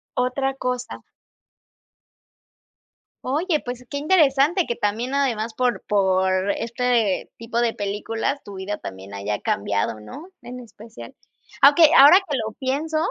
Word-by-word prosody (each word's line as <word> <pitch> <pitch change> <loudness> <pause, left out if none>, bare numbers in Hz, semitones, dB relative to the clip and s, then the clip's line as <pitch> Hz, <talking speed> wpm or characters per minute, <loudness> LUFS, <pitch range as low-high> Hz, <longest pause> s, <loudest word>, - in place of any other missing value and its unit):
Otra 265 +2 -1
cosa. 250 -1 -4 2.2
Oye, 305 +4 0
pues, 245 0 -7
qué 285 - -3
interesante 305 +1 +3
que 235 - -3
también 225 +5 -2
además 235 -5 -1
por 245 +2 -1
por 190 -1 +1
este 235 -3 -1
tipo 230 +1 -3
de 235 -1 0
películas 210 +6 -3
tu 205 - -11
vida 195 +2 -5
también 95 +1 -9
haya 100 +1 -3
cambiado, 100 +2 -2
¿no?, 105 - -11
en 245 0 -9
especial. 225 -1 -12 0.5
Aunque, 285 +4 +6 0.2
ahora 290 +6 +9
que 290 - -2
lo 220 -1 -4
pienso, 285 +5 -2
240 Hz, 130 wpm, -22 LUFS, 205-275 Hz, 2.2 s, ahora